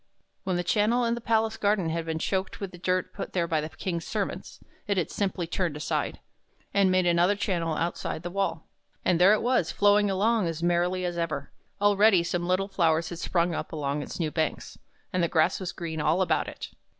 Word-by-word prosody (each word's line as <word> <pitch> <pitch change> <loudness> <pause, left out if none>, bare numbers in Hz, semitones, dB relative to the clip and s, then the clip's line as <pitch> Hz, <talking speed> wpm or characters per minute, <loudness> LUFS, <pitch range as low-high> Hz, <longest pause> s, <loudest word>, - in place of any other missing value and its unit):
When 185 -2 0
its 175 0 0
channel 230 +3 +2
in 230 - +1
the 235 - -4
palace 225 -1 +1
garden 200 -5 +1
had 165 0 -2
been 160 0 -1
choked 190 +3 -2
with 195 -2 -5
the 175 - -12
dirt 185 0 -1
put - - -6
there 170 -2 +1
by 160 -2 +1
the 155 - -5
King's 170 0 -4
servants, - - -4 0.3
it 200 -1 0
had 175 - 0
simply 190 -3 -1
turned 170 -2 -2
aside, 150 - -2 0.5
and 200 -1 +4
made 185 0 +3
another 175 +3 +3
channel 170 -5 -1
outside 165 0 -3
the 175 - -5
wall; 175 -4 -2 0.4
and 175 -1 +2
there 195 +3 +7
it 215 - +1
was, 245 -9 +2
flowing 205 0 +4
along 205 +1 +2
as 165 0 -4
merrily 175 +1 +1
as 175 -1 -2
ever. 155 -4 -3 0.3
Already 205 -2 +5
some 175 0 -2
little 185 +2 +1
flowers 165 -4 +1
had 175 - -7
sprung 175 -1 0
up - - -4
along 145 -2 -2
its - - -7
new 160 -3 -1
banks, 160 -1 -2 0.4
and 180 - +1
the 170 - +3
grass 160 -1 +2
was 185 -2 -4
green 160 -2 -4
all 165 +5 +2
about 175 - 0
it. - - -8
180 Hz, 210 wpm, -27 LUFS, 165-195 Hz, 0.5 s, there